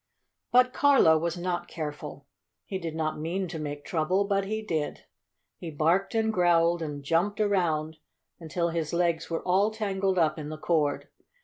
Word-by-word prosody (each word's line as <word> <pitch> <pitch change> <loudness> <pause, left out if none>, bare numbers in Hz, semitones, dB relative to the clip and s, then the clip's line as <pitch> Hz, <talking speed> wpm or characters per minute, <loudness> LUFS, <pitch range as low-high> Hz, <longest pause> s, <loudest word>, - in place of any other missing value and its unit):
But 250 0 +5
Carlo 275 - +5
was 170 +2 -2
not 175 0 -3
careful. 150 -3 -6 0.4
He 190 - -4
did 165 -3 -5
not 155 -1 -2
mean 180 +5 -2
to 160 - -5
make 145 -1 -5
trouble, 180 +4 +1
but 200 -1 0
he 220 +2 -3
did. 160 -8 -3 0.5
He 170 - -6
barked 165 +8 +1
and 220 0 +1
growled 175 -2 +3
and 145 -3 -5
jumped 175 +8 0
around 165 -7 0 0.4
until 170 +1 -2
his 165 -2 -3
legs 170 -2 0
were 165 - -3
all 190 +3 +3
tangled 195 -3 -1
up 155 -2 +2
in 150 -1 -6
the 155 - -6
cord. 155 -3 0
170 Hz, 170 wpm, -27 LUFS, 155-195 Hz, 0.5 s, But